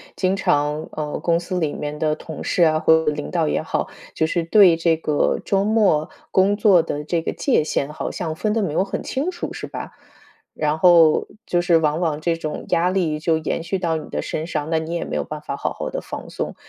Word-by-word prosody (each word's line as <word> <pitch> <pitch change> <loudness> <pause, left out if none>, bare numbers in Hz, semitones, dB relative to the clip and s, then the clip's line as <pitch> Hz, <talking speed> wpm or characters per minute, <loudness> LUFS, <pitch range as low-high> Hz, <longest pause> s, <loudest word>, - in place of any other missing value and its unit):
经 185 0 +1
常， 150 -3 0
呃， 150 -1 -4
公 170 -1 +2
司 180 +1 -3
里 155 -3 -1
面 150 0 -5
的 155 -1 +1
同 155 -1 -9
事 175 - +1
啊， 155 -1 +3
或 160 0 +4
者 150 - +2
领 150 0 -5
导 165 -3 0
也 - - 0
好， - - -2 0.2
就 160 - +1
是 165 +1 -1
对 185 -2 +6
这 165 0 +2
个 155 -2 0
周 195 0 +1
末 205 -9 +2 0.2
工 195 +2 +3
作 200 -5 +5
的 150 -2 -4
这 165 +2 -1
个 - - -3
界 270 - +2
限 140 -1 -1
好 150 - -4
像 165 -5 -4
分 210 +5 -1
得 225 - +1
没 180 - -1
有 190 - +1
很 195 - -4
清 280 +7 -2
楚 350 -1 -5
是 - - -6
吧？ - - -7 0.6
然 150 0 0
后 170 -3 +5 0.2
就 175 - +1
是 175 -1 +4
往 155 0 +1
往 155 -4 -1
这 165 +1 0
种 155 -2 -5
压 175 +2 +2
力 170 -5 0
就 160 0 +1
延 160 +1 -2
续 180 +4 -2
到 170 -3 -1
你 - - -8
的 - - -3
身 160 +2 -4
上， 155 -2 -3
那 160 -1 +1
你 160 +1 -5
也 170 - -2
没 - - -4
有 - - -2
办 150 -1 -7
法 140 - -5
好 - - -2
好 - - -5
的 - - -4
放 - - -8
松， - - -4
165 Hz, 260 characters per minute, -21 LUFS, 155-180 Hz, 0.6 s, 对